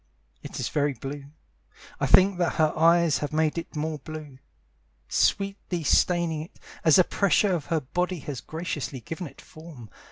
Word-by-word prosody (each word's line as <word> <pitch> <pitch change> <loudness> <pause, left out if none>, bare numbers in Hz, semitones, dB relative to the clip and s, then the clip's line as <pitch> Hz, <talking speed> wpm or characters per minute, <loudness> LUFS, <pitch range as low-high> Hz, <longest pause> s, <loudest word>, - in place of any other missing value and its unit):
It - - -7
is - - -2
very 145 -1 0
blue 140 +4 -7 0.7
I - - +1
think 190 -1 +5
that 175 - +1
her 155 -2 +2
eyes 165 -1 +4
have 145 - -3
made 155 +1 +1
it 165 - -10
more 155 0 -3
blue, 150 -2 -9 0.7
Sweetly 195 - 0
staining 165 +1 +2
it 160 - -12 0.2
As 160 - +6
the 185 - +7
pressure 200 +1 +2
of 165 -5 -2
her 165 -2 0
body 180 +7 -2
has 135 -4 -6
graciously 150 -3 -5
given 165 - -6
it - - -15
form. 155 - -13
160 Hz, 165 wpm, -26 LUFS, 145-175 Hz, 0.7 s, the